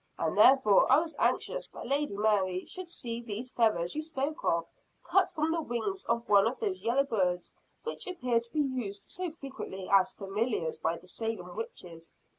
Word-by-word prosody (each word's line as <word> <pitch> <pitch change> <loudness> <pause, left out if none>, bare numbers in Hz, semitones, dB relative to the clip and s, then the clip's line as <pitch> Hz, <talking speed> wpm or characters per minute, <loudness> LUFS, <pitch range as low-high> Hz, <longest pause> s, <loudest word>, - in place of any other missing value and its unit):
And 160 -1 -1
therefore 215 0 +6
I 265 - +8
was 325 +1 -1
anxious - - 0
that - - -9
Lady 280 -6 0
Mary 195 -4 +1
should 370 -1 -5
see 235 -8 -3
these 235 +2 -5
feathers 215 -9 +1
you 310 - -1
spoke 305 -1 -3
of, 170 0 +1 0.4
cut 375 +2 +3
from 320 -1 -1
the 330 0 0
wings 310 - -3
of 235 0 -1
one 200 +1 +6
of 245 - -2
those 395 -4 -2
yellow 250 +4 +3
birds 185 -9 -1 0.3
which 465 - -4
appear 250 -10 +1
to 235 0 -11
be 305 - +1
used 245 -8 -3
so 365 -1 -3
frequently 270 - -7
as 195 -2 +4
familiars 195 -4 -2
by 165 +1 0
the - - -16
Salem 200 -3 -4
witches." 170 -6 -7
235 Hz, 185 wpm, -30 LUFS, 195-300 Hz, 0.4 s, I